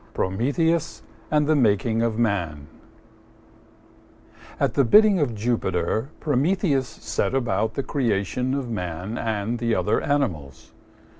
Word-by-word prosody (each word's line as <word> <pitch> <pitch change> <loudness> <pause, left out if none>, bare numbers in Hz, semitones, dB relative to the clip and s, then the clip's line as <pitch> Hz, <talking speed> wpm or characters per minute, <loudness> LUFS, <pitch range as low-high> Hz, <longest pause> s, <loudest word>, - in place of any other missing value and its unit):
PROMETHEUS 145 - 0 0.3
AND 150 -1 +2
THE 155 +1 +3
MAKING 115 -2 +2
OF 115 -2 0
MAN 90 -11 -1 1.9
At - - +1
the 140 - +3
bidding 210 - +5
of 130 -7 0
Jupiter, 110 - -1
Prometheus 145 -1 +1
set 130 - -3
about 120 -3 0
the 140 - -2
creation 125 +1 -1
of 135 -3 -3
Man 90 -1 -4
and 110 +1 -2
the 115 -1 0
other 90 - +1
animals. 85 - -2
120 Hz, 120 wpm, -24 LUFS, 100-140 Hz, 1.9 s, bidding